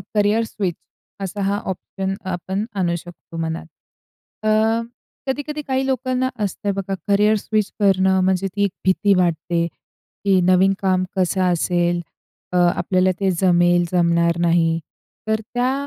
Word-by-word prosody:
Career 210 Hz, +2 st, +3 dB
switch 195 Hz, -6 st, -3 dB, 0.5 s
असा 195 Hz, +2 st, -4 dB
हा 200 Hz, +1 st, +1 dB
option 190 Hz, +1 st, -4 dB, 0.2 s
आपण 190 Hz, +4 st, -3 dB
आणू 175 Hz, -2 st, +1 dB
शकतो 170 Hz, 0 st, -10 dB
मनात. 165 Hz, 0 st, -3 dB, 0.8 s
अ, 215 Hz, -, +3 dB, 0.8 s
कधी-कधी 290 Hz, +3 st, -3 dB
काही 265 Hz, 0 st, 0 dB
लोकांना 260 Hz, -1 st, 0 dB
असतं 200 Hz, 0 st, -2 dB
बघा 195 Hz, 0 st, -3 dB
करियर 210 Hz, +2 st, +4 dB
स्विच 215 Hz, 0 st, -1 dB
करणं, 190 Hz, -2 st, +3 dB
म्हणजे 190 Hz, +1 st, +1 dB
ती 200 Hz, -, +1 dB
एक 200 Hz, -, +1 dB
भीती 200 Hz, +2 st, +3 dB
वाटते 170 Hz, 0 st, +1 dB
की 190 Hz, +3 st, -3 dB
नवीन 185 Hz, +2 st, +4 dB
काम 185 Hz, -1 st, +2 dB
कसं 185 Hz, +1 st, +1 dB
असेल? 175 Hz, 0 st, +1 dB, 0.5 s
अ, 180 Hz, -, 0 dB, 0.2 s
आपल्याला 185 Hz, +1 st, +2 dB
ते 195 Hz, -1 st, +2 dB
जमेल, 175 Hz, -1 st, +4 dB
जमणार 170 Hz, -1 st, +2 dB
नाही. 165 Hz, -1 st, +2 dB, 0.5 s
तर 220 Hz, 0 st, +1 dB
त्या 250 Hz, +2 st, +1 dB
190 Hz, 135 wpm, -21 LUFS, 175-205 Hz, 0.8 s, करियर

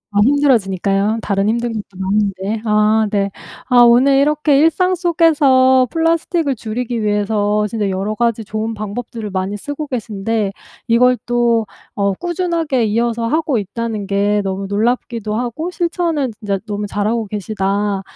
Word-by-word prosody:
더 205 Hz, -, +4 dB
힘들어지니까요, 215 Hz, -7 st, +2 dB
다른 200 Hz, 0 st, 0 dB
힘든 235 Hz, 0 st, -1 dB
것도 215 Hz, -2 st, -4 dB
많은데. 200 Hz, +2 st, -1 dB
아. 215 Hz, 0 st, +3 dB
네. 200 Hz, -1 st, 0 dB, 0.4 s
아 250 Hz, -1 st, +3 dB
오늘 250 Hz, +4 st, +5 dB
이렇게 295 Hz, 0 st, +3 dB
일상 360 Hz, +4 st, +3 dB
속에서 285 Hz, -7 st, +4 dB
플라스틱을 330 Hz, -2 st, 0 dB
줄이기 230 Hz, +1 st, -4 dB
위해서 210 Hz, 0 st, +1 dB
진짜 210 Hz, -2 st, -2 dB
여러 195 Hz, +3 st, -2 dB
가지 230 Hz, -1 st, 0 dB
좋은 220 Hz, +2 st, -3 dB
방법들을 215 Hz, +1 st, -6 dB
많이 190 Hz, +2 st, -2 dB
쓰고 290 Hz, +6 st, -6 dB
계신데 220 Hz, -3 st, -2 dB, 0.4 s
이걸 250 Hz, +2 st, +4 dB
또 240 Hz, -2 st, +1 dB, 0.3 s
어 200 Hz, -1 st, +1 dB
꾸준하게 335 Hz, -, -1 dB
이어서 230 Hz, +2 st, 0 dB
하고 300 Hz, -1 st, 0 dB
있다는 215 Hz, +1 st, -4 dB
게 205 Hz, +1 st, +1 dB
너무 195 Hz, 0 st, -3 dB
놀랍기도 220 Hz, 0 st, -1 dB
하고 245 Hz, +9 st, -3 dB
실천을 335 Hz, -7 st, -1 dB
진짜 200 Hz, -3 st, -2 dB
너무 205 Hz, 0 st, -3 dB
잘하고 215 Hz, +3 st, -1 dB
계시다 200 Hz, 0 st, -2 dB
225 Hz, 325 characters per minute, -17 LUFS, 205-260 Hz, 0.4 s, 오늘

